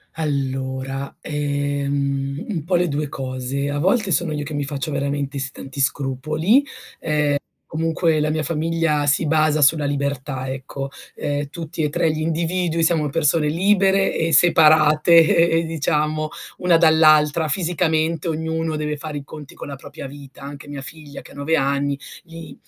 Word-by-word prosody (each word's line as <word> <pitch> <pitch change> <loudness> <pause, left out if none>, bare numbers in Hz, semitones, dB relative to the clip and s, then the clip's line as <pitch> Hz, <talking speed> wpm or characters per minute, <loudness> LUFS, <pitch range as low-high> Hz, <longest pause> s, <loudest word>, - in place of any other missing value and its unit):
Allora, 135 -2 -3
ehm, 140 -1 -2
un 165 -7 -3
po' 180 +2 0
le 175 0 +2
2 150 0 -2
cose: 135 +1 -4
a 145 - -2
volte 195 +5 +1
sono 170 -1 +1
io 145 -1 -3
che 150 +1 -7
mi 145 - -1
faccio 140 +2 -3
veramente 140 0 -2
s 135 0 -3
tanti 135 +1 -9
scrupoli, 155 - +1 0.3
ehm, 150 -2 0 0.3
comunque 160 0 0
la 150 - 0
mia 155 0 -1
famiglia 160 -1 0
si 145 +2 +3
basa 155 -1 +2
sulla 145 +1 +4
libertà, 140 -2 -3
ecco: 135 +1 -6 0.3
ehm, 145 0 -3
tutti 160 -1 -5
e 150 - +1
3 155 +2 +1
gli 155 0 -4
individui 165 +1 -1
siamo 160 -3 +2
persone 155 0 +2
libere 195 +3 +2
e 165 0 0
separate 155 0 +5 0.4
e 165 - +2
e - - -1
diciamo, 155 -1 -1 0.3
una 175 -2 +3
dall'altra 155 -1 +4
fisicamente, 165 -1 0
ognuno 160 0 -2
deve 150 0 -3
fare 150 0 -5
i 140 - -6
conti 150 0 -11
con - - -9
la 140 - -6
propria 135 +1 -9
vita, 140 -1 -13
anche 145 +1 -9
mia 145 -1 -7
figlia 150 0 -7
che - - -15
ha - - -15
9 145 +3 0
anni, 140 0 0 0.2
li 165 -1 -11
150 Hz, 165 wpm, -21 LUFS, 140-160 Hz, 0.4 s, separate